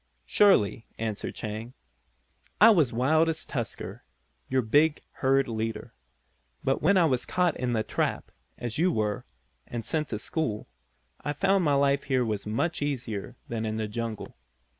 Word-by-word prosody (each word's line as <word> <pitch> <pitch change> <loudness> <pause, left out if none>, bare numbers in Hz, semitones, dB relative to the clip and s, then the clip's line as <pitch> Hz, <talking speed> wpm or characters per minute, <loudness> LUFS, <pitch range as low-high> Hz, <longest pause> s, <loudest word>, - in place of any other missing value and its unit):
"Surely," 125 - +4
answered 110 -2 -3
Chang, 110 +3 -6 0.8
"I 225 +3 +9
was 165 - +4
as 120 - -11
wild 155 +7 +3
as 160 -1 -3
Tusker, 120 -5 -5 0.5
your 130 -1 +2
big 145 +7 +3 0.2
herd 135 0 +3
leader. 110 -1 -4 0.7
But 135 - +1
when 190 +6 +4
I 175 - +5
was 130 -5 +1
caught 180 -3 +1
in 125 -1 -1
the 110 -1 +1
trap, - - -2 0.3
as 120 +2 -4
you 180 +2 +4
were, 105 -6 -1 0.4
and 115 -2 -5
sent 155 +4 0
to 110 - -3
school, 110 -2 -3 0.6
I 145 - -1
found 190 +2 +2
the 145 - +3
life 140 0 +2
here 130 -3 +1
was 105 -2 -3
much 140 +11 -1
easier 125 -5 -3
than 115 -1 -3
in 110 -1 -2
the 110 -1 -2
jungle. 115 0 -5
130 Hz, 160 wpm, -28 LUFS, 110-155 Hz, 0.8 s, I